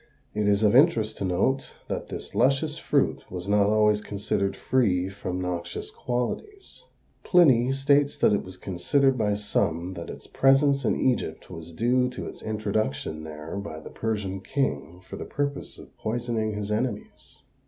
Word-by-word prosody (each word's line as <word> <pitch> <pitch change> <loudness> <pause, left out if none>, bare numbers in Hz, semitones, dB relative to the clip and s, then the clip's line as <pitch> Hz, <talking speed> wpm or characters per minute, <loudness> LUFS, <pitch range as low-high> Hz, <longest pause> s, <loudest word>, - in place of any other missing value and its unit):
It 105 0 0
is 100 +1 +3
of 105 +2 +4
interest 130 -7 +4
to 100 - -1
note 100 +10 0
that - - -4
this - - -7
luscious 140 +3 +2
fruit - - +1
was 90 0 -5
not 100 0 +4
always 105 0 +3
considered 100 -1 -2
free 95 -9 +1
from 95 -2 -4
noxious 90 -2 -4
qualities. 390 - -4 0.4
Pliny 135 -9 +5
states 140 +1 +2
that - - +4
it 100 - +2
was 95 0 -10
considered 130 +10 +1
by 105 -4 +1
some 90 -3 -1
that 85 -2 -7
its - - -9
presence 135 0 +3
in - - +1
Egypt 120 -10 -1
was 80 -1 -8
due 125 +8 +2
to 125 - -6
its - - -9
introduction 105 -7 -2
there 80 +3 -7
by 100 -6 -6
the - - -11
Persian 105 -4 -3
king 90 - -2
for - - -9
the - - -5
purpose 140 0 -3
of - - -14
poisoning 110 -1 -2
his 105 0 -4
enemies. 110 0 -4
105 Hz, 165 wpm, -26 LUFS, 95-130 Hz, 0.4 s, Pliny